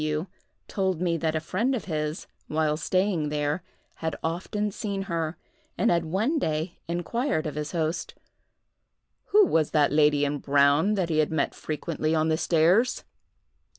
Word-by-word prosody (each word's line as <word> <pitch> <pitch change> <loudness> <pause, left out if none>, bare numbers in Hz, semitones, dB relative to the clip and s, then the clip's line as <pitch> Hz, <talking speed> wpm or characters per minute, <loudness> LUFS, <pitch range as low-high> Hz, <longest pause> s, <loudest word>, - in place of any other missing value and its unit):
W—— 155 +2 -1 0.4
told 190 -4 -1
me 175 -1 +1
that 160 0 -1
a - - +1
friend 220 +11 0
of 235 - -4
his, 155 -2 -3 0.2
while 155 -1 +1
staying 185 -2 0
there, 150 +2 -1 0.4
had 160 -2 -3
often 190 +5 -2
seen 195 -1 -3
her, 165 -3 -3 0.4
and - - +3
had 170 -1 +1
one 215 - 0
day 160 - -2
inquired 175 - -1
of 155 - -3
his 150 0 -4
host, 165 -1 -2 1.1
"Who 420 0 +5
was 160 - +2
the 150 -2 +3
lady 150 -1 +4
in 145 0 -2
brown 145 +8 +3
that 185 -4 -1
he 155 -1 +1
had 155 - +2
met 155 -3 0
frequently 155 0 -2
on 160 0 +2
the 160 - +2
stairs?" 175 +10 +3
160 Hz, 160 wpm, -26 LUFS, 155-185 Hz, 1.1 s, Who